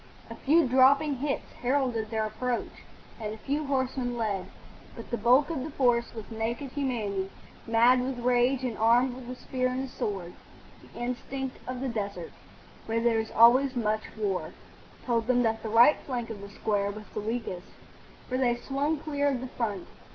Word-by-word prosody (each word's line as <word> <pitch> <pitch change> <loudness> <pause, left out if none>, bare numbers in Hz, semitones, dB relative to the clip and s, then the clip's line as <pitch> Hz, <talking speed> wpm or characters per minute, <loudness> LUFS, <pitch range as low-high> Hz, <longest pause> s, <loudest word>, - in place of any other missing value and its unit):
A - - -6
few 315 +2 +3
dropping 265 +2 +4
shots 285 -1 -1 0.2
heralded 245 -4 0
their 220 -1 0
approach, 240 +3 -2 0.5
and 215 -2 -4
a 220 - -6
few 285 +6 -2
horsemen 260 -2 -1
led, 205 -5 -1 0.5
but 230 - -10
the - - +1
bulk 260 +7 +4
of 320 - -2
the 310 - -5
force 245 -5 +1
was 220 -2 -6
naked 235 +4 -3
humanity, 215 -9 -2 0.4
mad 235 +3 +5
with 255 0 -3
rage, 250 +2 +2
and 245 -3 -2
armed 240 +3 +4
with 250 -1 -10
the 250 - -5
spear 255 0 -2
and 255 +1 -2
the - - -4
sword. 195 -8 -4 0.5
The - - -13
instinct 255 +2 -4
of 255 0 -4
the 270 - -1
desert, 200 -7 -4 0.6
where 225 +1 0
there 230 -1 +2
is 220 - -3
always 255 +4 +6
much 215 -2 0 0.2
war, 200 -4 -2 0.5
told 230 -2 0
them 245 -1 +3
that 225 -1 0
the 220 - -4
right 235 +7 +6
flank 240 -4 -3
of 205 -3 -7
the 200 - -9
square 200 0 -1
was 210 +1 -7
the 210 - -3
weakest, 215 -5 -4 0.6
for 255 0 -1
they 245 -2 +3
swung 275 +5 -1
clear 285 -1 -1
of 270 -3 +1
the 260 +1 -6
front. 210 -8 -3
245 Hz, 185 wpm, -28 LUFS, 220-260 Hz, 0.6 s, always